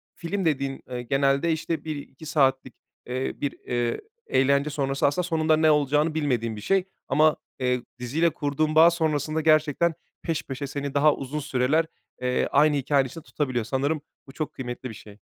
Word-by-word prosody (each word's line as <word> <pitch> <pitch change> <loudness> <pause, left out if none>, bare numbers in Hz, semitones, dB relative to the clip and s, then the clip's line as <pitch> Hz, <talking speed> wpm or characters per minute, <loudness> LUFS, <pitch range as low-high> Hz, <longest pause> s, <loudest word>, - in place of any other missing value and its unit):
film 185 +3 -3
dediğin, 140 -3 -1
ııı, 125 -1 -4
genelde, 135 +5 +2
işte, 160 +1 -2
1-2 150 -1 -7
saatlik, 135 -4 +1 0.3
eee, 130 +2 -2
bir, 145 -1 -2
eee, 120 -1 -2 0.3
eğlence 140 +2 +2
sonrası 140 -2 0
aslında 145 +6 0
sonunda 160 -2 +2
ne 155 0 +5
olacağını 150 +2 +2
bilmediğin 125 -8 0
bir 105 - -8
şey. 195 - +2 0.2
Ama, 155 0 +4 0.2
eee, 125 -1 +1 0.2
diziyle 150 +8 +1
kurduğun 155 0 -1
bağ 165 +2 +8
sonrasında 160 -1 0
gerçekten 155 +1 +3 0.3
peş 165 -2 -2
peşe 140 +1 -5
seni 140 0 -4
daha 150 +1 +4
uzun 140 +3 -4
süreler, 145 +2 +1 0.4
eee, 125 0 +1
aynı 150 +1 +4
hikâyenin 140 0 +2
içinde 165 +5 -10
tutabiliyor. 130 -6 -2
Sanırım 140 +5 -1 0.3
bu - - -11
çok 155 +2 -4
kıymetli 125 0 -6
bir - - -8
şey. 105 0 -14
145 Hz, 170 wpm, -25 LUFS, 130-155 Hz, 0.4 s, bağ